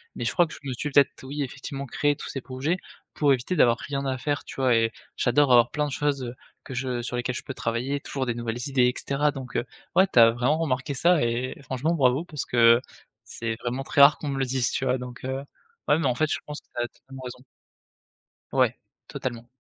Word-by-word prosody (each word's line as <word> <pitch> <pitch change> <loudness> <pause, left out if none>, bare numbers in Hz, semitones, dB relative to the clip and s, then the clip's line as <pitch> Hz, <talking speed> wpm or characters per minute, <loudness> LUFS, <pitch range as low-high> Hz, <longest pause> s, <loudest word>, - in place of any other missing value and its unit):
Mais 120 - -4
je 120 - +1
crois 175 - +4
que - - -11
je - - -12
me 130 - -2
suis 150 +5 -3
peut-être 140 -1 +3
oui 140 +2 -3
effectivement 140 +1 -6
créé 145 +3 +1
tous - - -8
ces 135 - -4
projets 135 +8 -2 0.4
pour 145 -2 +3
éviter 130 +8 -2
d'avoir 120 -7 +5
rien 140 +1 -4
à 130 -1 -1
faire, 145 +2 -2
tu - - -9
vois? 130 -3 +3
Et 115 0 +2 0.2
j'adore 135 +3 +3
avoir 120 -1 +6
plein 150 0 -1
de 145 - -4
choses 135 -4 -1 0.3
que - - -8
je 125 -1 -2
sur 125 - -4
lesquelles 125 0 -2
je - - -5
peux 135 - -6
travailler, 125 +4 -2
toujours 135 -1 -4
des 120 - -1
nouvelles 115 0 -3
idées 130 -3 +3
et 125 - +1
cetera. 145 +2 0
Donc 135 -3 -8
heu, 115 - +1 0.3
ouais, 190 +1 +6
tu - - -3
as 115 0 +8
vraiment 125 +6 +1
remarqué 140 -3 -1
ça 170 +4 +4
et 120 +2 -1
franchement 140 +3 -1
bravo 135 0 +2
parce 150 -6 -5
que 115 0 +5 0.4
c'est 115 -1 -4
vraiment 125 +3 -2
très 140 - +2
rare 140 +2 +8
qu'on 150 - -6
me 135 -1 -2
le 135 - +1
dise, 125 -1 0
tu 135 - -1
vois? 130 0 +2
Donc 125 -1 -9
heu, 130 +1 -2 0.5
ouais 150 - +4
mais 165 - +1
en 125 - +1
fait 155 +3 +1
je - - 0
pense 150 0 -6
que - - -39
tu 120 - 0
as - - -2
totalement 135 +2 -13
raison 125 0 -8 1.1
Ouais, - - +2 0.3
totalement. 120 -2 -5
130 Hz, 240 wpm, -26 LUFS, 120-145 Hz, 1.1 s, as